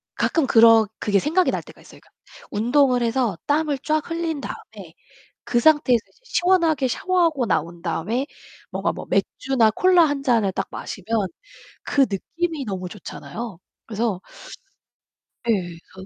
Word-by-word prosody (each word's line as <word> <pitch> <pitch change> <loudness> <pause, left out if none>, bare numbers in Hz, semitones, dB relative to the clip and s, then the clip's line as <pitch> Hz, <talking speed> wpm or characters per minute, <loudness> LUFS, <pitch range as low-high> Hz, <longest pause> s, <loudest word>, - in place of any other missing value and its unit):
가끔 320 -5 +1
그런 225 -2 +6
그게 205 -2 +2
생각이 330 - +2
날 - - -2
때가 - - -16
있어요. - - -16
그러니까 - - -26 0.4
운동을 245 +3 +2
해서 230 -6 0
땀을 295 -1 +1
쫙 310 +3 0
흘린 330 -3 -2
다음에 - - -9 0.5
그 240 - +1
상태에서 290 -4 +4
이제 - - -30
시원하게 340 - +2
샤워하고 330 -3 +1
나온 170 -2 -1
다음에 210 - -2 0.4
뭔가 - - -1
뭐 - - -8
맥주나 245 -5 +1
콜라 360 - +4
1 290 -2 -1
잔을 230 -7 +2
딱 195 - -3
마시면 205 0 -3 0.6
그 280 - +1
느낌이 315 - -3
너무 185 -3 -4
좋잖아요. 215 +1 -8 0.3
그래서 215 -4 -2 1.3
예 - - +4
그래서 185 -1 -5
245 Hz, 310 characters per minute, -22 LUFS, 205-305 Hz, 1.3 s, 그런